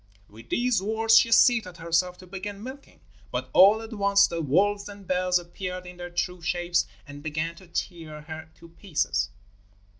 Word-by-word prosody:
With 115 Hz, +2 st, -15 dB
these 245 Hz, -5 st, +1 dB
words 220 Hz, +2 st, +2 dB
she 230 Hz, -, +1 dB
seated 225 Hz, -7 st, +4 dB
herself 170 Hz, +2 st, 0 dB
to 185 Hz, -, -13 dB
begin 200 Hz, +2 st, -7 dB
milking, 265 Hz, +3 st, -11 dB, 0.3 s
but 130 Hz, +2 st, -4 dB
all 210 Hz, +4 st, +7 dB
at 225 Hz, +1 st, -8 dB
once 200 Hz, -1 st, +4 dB
the 170 Hz, -1 st, -3 dB
wolves 200 Hz, +8 st, +1 dB
and 200 Hz, -1 st, -11 dB
bears 180 Hz, 0 st, +2 dB
appeared 180 Hz, +1 st, -6 dB
in 180 Hz, 0 st, -10 dB
their 175 Hz, 0 st, -7 dB
true 180 Hz, 0 st, -3 dB
shapes 175 Hz, +1 st, 0 dB, 0.2 s
and 145 Hz, 0 st, -10 dB
began 155 Hz, +2 st, -3 dB
to 185 Hz, -, -15 dB
tear 165 Hz, -3 st, -5 dB
her 160 Hz, +1 st, -9 dB
to 170 Hz, 0 st, -15 dB
pieces. 155 Hz, -, -1 dB
180 Hz, 175 wpm, -26 LUFS, 165-200 Hz, 0.3 s, all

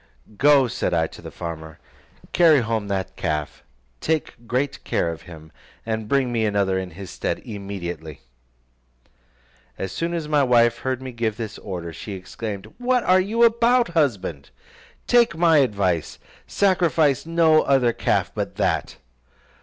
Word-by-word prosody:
"Go," 140 Hz, +2 st, +5 dB
said 115 Hz, -, -1 dB
I 80 Hz, -1 st, +2 dB
to -, -, -11 dB
the -, -, -8 dB
farmer, 80 Hz, -2 st, -7 dB, 0.6 s
"carry 160 Hz, -6 st, +5 dB
home 110 Hz, -2 st, -2 dB
that 95 Hz, -2 st, -3 dB
calf, 75 Hz, -1 st, -3 dB, 0.4 s
take 150 Hz, -7 st, -2 dB
great 130 Hz, +4 st, -2 dB
care 85 Hz, -, 0 dB
of 80 Hz, -, -8 dB
him, 80 Hz, -2 st, -12 dB, 0.3 s
and 110 Hz, -1 st, -3 dB
bring 135 Hz, 0 st, +1 dB
me 115 Hz, -2 st, 0 dB
another 100 Hz, -3 st, +1 dB
in 95 Hz, -1 st, -5 dB
his 95 Hz, -3 st, -8 dB
stead -, -, -2 dB
immediately." 95 Hz, -, -6 dB, 1.6 s
As 95 Hz, -, -4 dB
soon 170 Hz, +7 st, -2 dB
as 160 Hz, -3 st, -3 dB
my 150 Hz, -1 st, +3 dB
wife 120 Hz, -3 st, +3 dB
heard 130 Hz, -1 st, -3 dB
me 130 Hz, -, -6 dB
give 115 Hz, -3 st, -2 dB
this 110 Hz, -3 st, -6 dB
order, 85 Hz, -4 st, -6 dB
she 100 Hz, -, -7 dB
exclaimed, 100 Hz, +2 st, -7 dB
"What 250 Hz, -1 st, +1 dB
are 185 Hz, +1 st, +4 dB
you 220 Hz, +5 st, +1 dB
about, 235 Hz, 0 st, +4 dB
husband? 100 Hz, -, -1 dB, 0.6 s
Take 235 Hz, -8 st, +3 dB
my 165 Hz, -2 st, +5 dB
advice, 100 Hz, -, 0 dB, 0.3 s
sacrifice 165 Hz, -7 st, +2 dB
no 165 Hz, -2 st, +4 dB
other 130 Hz, -4 st, +2 dB
calf -, -, 0 dB
but -, -, -4 dB
that." -, -, -1 dB
120 Hz, 150 wpm, -23 LUFS, 95-160 Hz, 1.6 s, Go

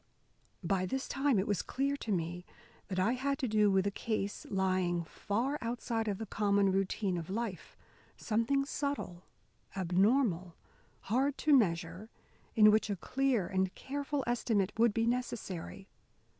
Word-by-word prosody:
By 185 Hz, +1 st, 0 dB
this 265 Hz, +6 st, -3 dB
time 270 Hz, -3 st, +1 dB
it 190 Hz, -, +1 dB
was 205 Hz, -5 st, 0 dB
clear 275 Hz, +2 st, -1 dB
to 225 Hz, -, -5 dB
me 175 Hz, -1 st, -2 dB, 0.4 s
that 185 Hz, -, -4 dB
I 185 Hz, +5 st, +3 dB
had 275 Hz, +2 st, -1 dB
to 260 Hz, -, -1 dB
do 210 Hz, -1 st, +3 dB
with 190 Hz, -1 st, +2 dB
a 200 Hz, -, +1 dB
case 205 Hz, -1 st, -3 dB
lying 185 Hz, -3 st, +1 dB
far 235 Hz, -, -2 dB
outside 230 Hz, -1 st, -2 dB
of 200 Hz, -2 st, -1 dB
the 225 Hz, -, -5 dB
common 200 Hz, -1 st, +2 dB
routine 195 Hz, 0 st, 0 dB
of 165 Hz, -, -8 dB
life; 210 Hz, -2 st, -4 dB, 0.4 s
something 235 Hz, +5 st, +1 dB
subtle, 280 Hz, -12 st, -4 dB, 0.5 s
abnormal, 185 Hz, 0 st, +2 dB, 0.5 s
hard 265 Hz, +6 st, 0 dB
to 300 Hz, -2 st, +7 dB
measure, 180 Hz, -2 st, 0 dB, 0.5 s
in 215 Hz, -1 st, +8 dB
which 215 Hz, 0 st, +2 dB
a 200 Hz, -, 0 dB
clear 255 Hz, +1 st, 0 dB
and 190 Hz, +1 st, -1 dB
careful 285 Hz, 0 st, -3 dB
estimate 225 Hz, -5 st, +1 dB
would 230 Hz, 0 st, +4 dB
be 225 Hz, +2 st, 0 dB
necessary. 230 Hz, -6 st, -3 dB
210 Hz, 150 wpm, -32 LUFS, 190-250 Hz, 0.5 s, in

